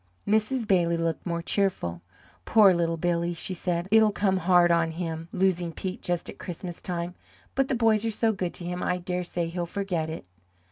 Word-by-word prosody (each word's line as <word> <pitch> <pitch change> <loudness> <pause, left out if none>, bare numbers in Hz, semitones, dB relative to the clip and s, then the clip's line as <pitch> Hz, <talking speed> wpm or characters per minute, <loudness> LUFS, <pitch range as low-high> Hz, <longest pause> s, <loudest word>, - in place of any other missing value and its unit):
Mrs. 220 +3 +1
Bailey 170 -3 +3
looked 165 +1 -2
more 170 -1 -2
cheerful. 170 - 0 0.4
"Poor 210 -4 +6
little 165 -1 0
Billy!" 170 +1 0
she 185 - -4
said. 175 0 -2
"It'll 220 -1 +6
come 195 -2 +1
hard 175 -1 +4
on 165 -1 +3
him, 165 -1 -4
losing 180 -2 +1
Pete 185 +2 -5
just 175 -1 -2
at - - -9
Christmas 175 -1 -6
time. 175 -1 -3 0.4
But 270 0 +1
the 265 - 0
boys 225 -2 +3
are 230 - 0
so 225 +1 +1
good 185 -4 -3
to 175 - -6
him, 180 +1 -3
I 180 - 0
dare 180 0 -3
say 170 -1 -2
he'll 175 +1 -3
forget 175 -4 -2
it." 160 - -6
180 Hz, 195 wpm, -27 LUFS, 170-195 Hz, 0.4 s, Poor